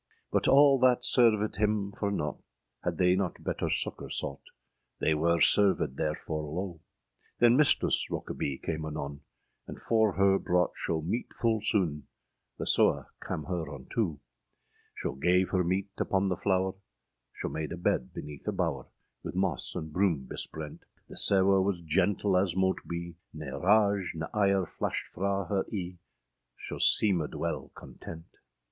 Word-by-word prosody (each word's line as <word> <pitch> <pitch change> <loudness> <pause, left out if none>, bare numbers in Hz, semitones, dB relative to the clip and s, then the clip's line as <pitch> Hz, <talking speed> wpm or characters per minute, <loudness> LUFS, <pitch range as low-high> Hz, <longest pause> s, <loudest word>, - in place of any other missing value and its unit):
â - - -54 0.3
But - - +2
all 140 -1 +6
that 125 -1 +4
servèd 110 -5 +3
him 105 -1 0
for 100 0 -2
nought,â 75 -7 -3 0.4
Had 85 -2 -1
they 90 +1 +4
not 95 -2 -2
better - - -2
succour - - -1
sought, 70 - -3 0.6
They 80 - +2
wer 85 +2 +2
servèd 95 -4 +4
therfore 75 0 -3
loe. 90 0 -4 0.6
Then 120 0 +5
Mistress 150 +1 +3
Rokebye 70 -2 -4
came 80 -1 -3
anon, 70 -2 -5 0.5
And - - -8
for 110 -3 +2
her 95 0 +3
brought 90 0 +1
scho 80 -2 -1
meete 115 +9 -3
ful 115 -2 +1
soone, 85 - 0 0.5
The - - -4
sewe - - +3 0.2
cam 75 - -4
her 90 -2 -3
untoe. 75 - -3 0.8
Scho - - -3
gav 90 +3 +3
her 90 -1 +1
meete 95 +3 -1
upon 95 0 +1
the 90 - 0
flower; 95 0 0 0.6
[Scho - - -4
made 80 -1 -4
a 90 - -4
bed 60 -7 0
beneath 75 -1 -9
a - - +2
bower, - - -2 0.3
With - - -6
moss 95 -6 -1
and 80 -1 -5
broom 90 -8 +1
besprent; 75 +3 -5 0.3
The - - -10
sewe 95 0 +4
was 95 -2 0
gentle 95 +4 +1
as 90 -2 +1
mote 95 0 +1
be, 85 0 -5 0.2
Ne 75 -3 -6
rage 100 +1 +2
ne 80 0 -3
ire 100 -3 +2
flashed - - -3
fra 100 +1 -1
her 95 +1 0
eâe, 90 -4 -5 0.6
Scho - - -6
seemèd 90 -8 +3
wele - - -3
content. 80 0 -10
95 Hz, 155 wpm, -29 LUFS, 80-100 Hz, 0.8 s, all